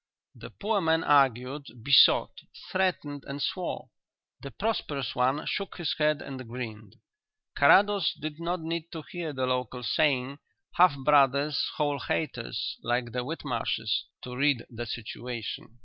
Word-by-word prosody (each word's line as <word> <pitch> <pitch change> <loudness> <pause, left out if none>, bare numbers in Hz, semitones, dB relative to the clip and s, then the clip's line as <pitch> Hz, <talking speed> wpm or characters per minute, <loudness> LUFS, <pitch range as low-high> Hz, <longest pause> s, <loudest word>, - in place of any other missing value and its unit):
The - - -10
poor 205 0 -1
man 160 -1 +2
argued, 135 0 +2 0.2
besought, 135 0 +5 0.3
threatened 170 -7 -1
and 140 +1 -5
swore; 135 - -3 0.5
the 140 - -7
prosperous 150 - -2
one 130 +5 +1
shook 200 -1 -3
his 170 -4 -1
head 150 -1 +2
and 130 -3 -8
grinned. 110 -4 -7 0.6
Carrados 200 +5 +5
did 155 0 -5
not 170 +1 -2
need 165 +1 -4
to 160 -2 -6
hear 170 -3 -4
the 130 -2 -1
local 125 -1 -2
saying: 135 +2 +1 0.3
"Half 175 -5 +5
brothers: 140 0 +4
whole 145 -2 0
haters; 130 - -3
like 120 0 -1
the 125 +1 -2
Whitmarshes," 120 -6 -2 0.2
to 125 0 -7
read 140 -2 +2
the 120 0 -6
situation. 120 0 -6
140 Hz, 135 wpm, -28 LUFS, 125-160 Hz, 0.6 s, besought